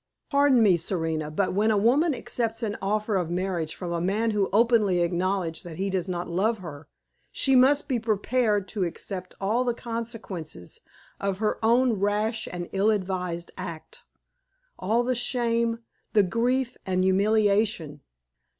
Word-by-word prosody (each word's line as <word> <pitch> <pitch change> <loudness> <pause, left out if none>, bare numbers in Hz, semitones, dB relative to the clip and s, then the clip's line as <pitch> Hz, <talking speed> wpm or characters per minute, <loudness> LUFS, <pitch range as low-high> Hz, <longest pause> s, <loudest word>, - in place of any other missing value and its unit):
Pardon 280 -4 +5
me, 190 -5 +5
Serena, 160 -3 -2
but 185 +5 -1
when 210 +3 +2
a 215 - +3
woman 270 +9 +3
accepts 230 -2 -3
an 205 -2 -1
offer 210 +1 0
of 175 -3 -1
marriage 175 -3 -2
from 180 -2 -5
a 170 -1 -1
man 210 +5 +1
who 205 -2 0
openly 215 -5 +3
acknowledges 175 -1 -1
that 165 -2 -9
he 195 +1 -1
does 185 -1 -1
not 175 -1 -3
love 205 +7 0
her, 160 -6 -9 0.4
she 270 -1 +2
must 270 +3 +5
be 255 -4 0
prepared 215 -1 +1
to 205 -3 -2
accept 185 +1 -5
all 215 +6 +1
the 240 -2 -1
consequences 225 - -6 0.4
of 195 -1 -1
her 215 +1 -1
own 240 +2 +4
rash 210 +3 0
and 175 -1 -5
ill 200 +2 +2
advised 180 -4 -2
act 170 -3 -8 0.8
all 225 +5 +1
the 255 +1 0
shame, 235 -1 0 0.3
the 210 - +5
grief, 240 +5 0
and 185 -1 0
humiliation. 200 -5 +2
205 Hz, 155 wpm, -26 LUFS, 180-230 Hz, 0.8 s, Pardon